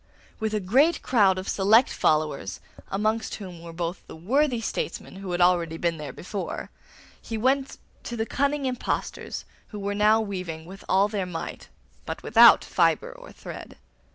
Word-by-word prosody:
With 220 -1 -1
a - - +1
great 265 - +3
crowd 200 -7 +4
of 185 - -5
select 215 +5 +4
followers, 150 -11 0 0.3
amongst 215 +3 -1
whom 180 -5 -9
were 170 0 -9
both 170 +2 -4
the - - -10
worthy 250 - +1
statesmen 220 - -4
who 195 -2 -6
had 175 0 0
already 170 -2 +3
been 170 -1 -1
there 150 -1 -6
before, 195 +2 -6 0.5
he 225 - -5
went 265 +4 +1 0.3
to 240 - -5
the 225 - 0
cunning 280 +3 0
impostors, 250 -1 -3 0.2
who 210 - -9
were 200 0 -2
now 210 +2 +4
weaving 180 -7 -4
with 195 +3 -11
all 195 +2 +4
their 205 -3 -3
might, 165 -2 -6 0.4
but - - -5
without - - +7
fibre - - +1
or - - -13
thread. - - -10
200 Hz, 165 wpm, -26 LUFS, 175-225 Hz, 0.5 s, without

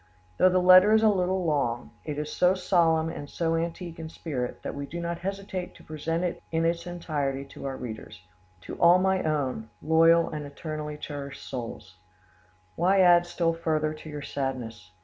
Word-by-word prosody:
Though 185 - +6
the 185 - +2
letter 185 +3 +7
is 220 - +3
a 220 - +6
little 185 -2 0
long, 120 -7 -1
it 150 -2 -4
is 150 0 -4
so 180 +1 +3
solemn 165 -3 +2
and 145 -3 -7
so 165 -1 -1
antique 170 +1 -4
in 160 -1 -6
spirit, 130 -7 -5
that - - -4
we 140 0 -5
do 170 - -6
not 170 0 -3
hesitate 190 -1 -5
to - - -16
present 165 +2 -3
it 175 - -3
in 165 0 +1
its 170 +1 -1
entirety 145 -6 -3
to - - -10
our 135 -1 -4
readers:— 110 -4 -8 0.4
"To - - -8
all 170 +1 +7
my 190 0 +2
own 135 -7 -2
"Loyal 165 +1 +4
and 150 -1 -4
eternally 150 0 -6
cherished 140 -2 -7
souls 115 -7 -7 0.8
"Why 190 +2 +3
add 175 -1 +6
still 170 -1 0
further 155 -2 -1
to 155 0 -11
your 150 -1 -6
sadness? 120 -9 -4
165 Hz, 185 wpm, -27 LUFS, 145-175 Hz, 0.8 s, letter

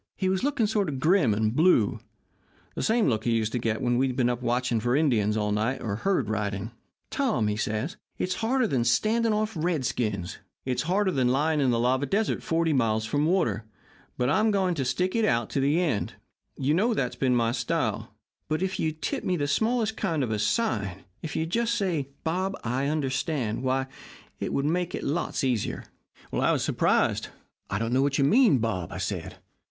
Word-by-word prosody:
He 190 -1 0
was 190 +3 0
looking 280 -5 +1
sort 205 -4 0
of 135 -3 -4
grim 165 - +3
and 110 +2 0
blue 155 - +3 0.7
the - - -4
same 225 0 +2
look 110 -4 0
he 120 - +1
used 110 -1 0
to 125 - -1
get 110 -2 -1
when 120 0 +2
he'd 130 -2 0
been 125 -2 +2
up 120 0 -4
watching 125 -1 0
for 120 +3 +1
Indians 110 -8 +2
all 105 -1 0
night 110 +6 0
or 100 -3 -3
herd 180 - 0
riding. 105 0 -2 0.4
"'Tom,' 210 - 0
says 115 - -2 0.2
he, - - -3
'it's 185 - 0
harder 250 +3 +2
than 130 - +1
standing 220 - +2
off 215 +1 0
redskins; 130 - -1 0.3
it's 130 -1 0
harder 195 +1 +2
than 130 -6 +1
lying 150 +4 +2
in 135 - +3
the 120 - +2
lava 130 +4 +1
desert 210 +8 0
forty 165 -1 +1
miles 110 -4 +1
from 145 +7 +1
water; 140 - +1 0.5
but 125 - +1
I'm 215 - +3
going 190 -3 +1
to 140 -5 -2
stick 180 - 0
it 230 - +2
out 115 - +1
to - - 0
the 145 +5 +2
end. 150 - -1 0.4
You 140 +3 +1
know 220 +7 +2
that's 125 - -1
been 130 -2 +1
my 115 -1 +2
style. 120 -1 -2 0.4
But 155 +4 -1
if 190 0 -2
you'd 155 0 -2
tip - - -2
me 180 - 0
the 145 -2 -1
smallest 220 +8 +1
kind 165 -8 0
of 115 - -2
a 105 - -1
sign 100 - -1 0.2
if 155 -3 -5
you'd 160 +1 -2
just 235 +2 +1
say, 170 - -1
"Bob 185 +4 -1
I 125 +4 -1
understand," 135 -5 -1
why, 130 0 0 0.5
it - - -3
would 140 - 0
make 175 +3 0
it - - -5
lots 155 +1 -1
easier.' 125 -5 -1 0.5
"I - - +2
was - - +1
surprised. - - +1 0.4
'I 95 - -1
don't 115 +3 -1
know 130 - +3
what 140 0 +1
you 140 - +3
mean, 210 - +5
Bob,' 105 -8 -2
I - - -5
said. - - -4
135 Hz, 205 wpm, -27 LUFS, 115-185 Hz, 0.7 s, mean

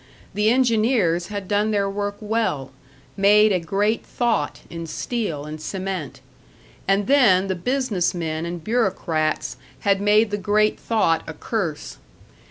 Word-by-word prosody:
The 210 +2 +2
engineers 225 -8 +2
had 205 -2 -5
done 210 +2 +1
their 200 -2 +1
work 205 +1 -3
well, 210 -12 -1 0.4
made 210 +2 +5
a 185 - +2
great 200 +6 0
thought 230 -12 -1
in 165 -1 -7
steel 160 -4 -3
and 155 0 -7
cement. 190 -5 -5 0.7
And 195 +1 +2
then 210 -8 +5
the 190 - -1
business 210 -2 -1
men 160 -2 -3
and 170 -1 -5
bureaucrats 170 - -1 0.2
had 200 -1 +2
made 210 +1 +3
the 205 - 0
great 210 +2 +1
thought 190 -8 +1
a 160 - -5
curse. 170 -4 -4
200 Hz, 140 wpm, -22 LUFS, 170-215 Hz, 0.7 s, made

